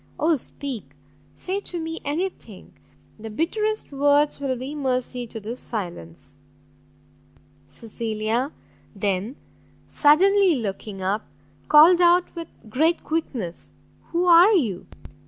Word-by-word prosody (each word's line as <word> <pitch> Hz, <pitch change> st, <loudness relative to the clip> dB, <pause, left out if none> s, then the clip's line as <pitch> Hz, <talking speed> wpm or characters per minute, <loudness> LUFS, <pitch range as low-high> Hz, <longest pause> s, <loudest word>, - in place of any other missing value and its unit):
oh 320 Hz, +1 st, +3 dB
speak! 245 Hz, -, -7 dB, 0.4 s
say 380 Hz, -, -2 dB
to 355 Hz, -3 st, -3 dB
me 325 Hz, 0 st, -5 dB
any 310 Hz, +6 st, -1 dB
thing; 380 Hz, -, -14 dB, 0.5 s
the 225 Hz, +1 st, -7 dB
bitterest 425 Hz, -, -2 dB
words 285 Hz, +1 st, +2 dB
will 265 Hz, -2 st, -1 dB
be 260 Hz, +4 st, -6 dB
mercy 255 Hz, -3 st, -2 dB
to 225 Hz, -, -7 dB
this 225 Hz, +4 st, -6 dB
silence!" 140 Hz, -, -7 dB, 1.4 s
Cecilia 225 Hz, -, -3 dB, 0.4 s
then, 200 Hz, +4 st, -2 dB, 0.5 s
suddenly 370 Hz, +4 st, +4 dB
looking 200 Hz, -4 st, -5 dB
up, 200 Hz, +3 st, -1 dB, 0.4 s
called 330 Hz, +4 st, +7 dB
out 350 Hz, +1 st, +4 dB
with 335 Hz, -1 st, -6 dB, 0.2 s
great 315 Hz, +10 st, +1 dB
quickness, 250 Hz, -, -4 dB, 0.3 s
"Who 345 Hz, +1 st, 0 dB
are 355 Hz, +4 st, +7 dB
you?" 220 Hz, -, 0 dB
275 Hz, 115 wpm, -23 LUFS, 215-335 Hz, 1.4 s, called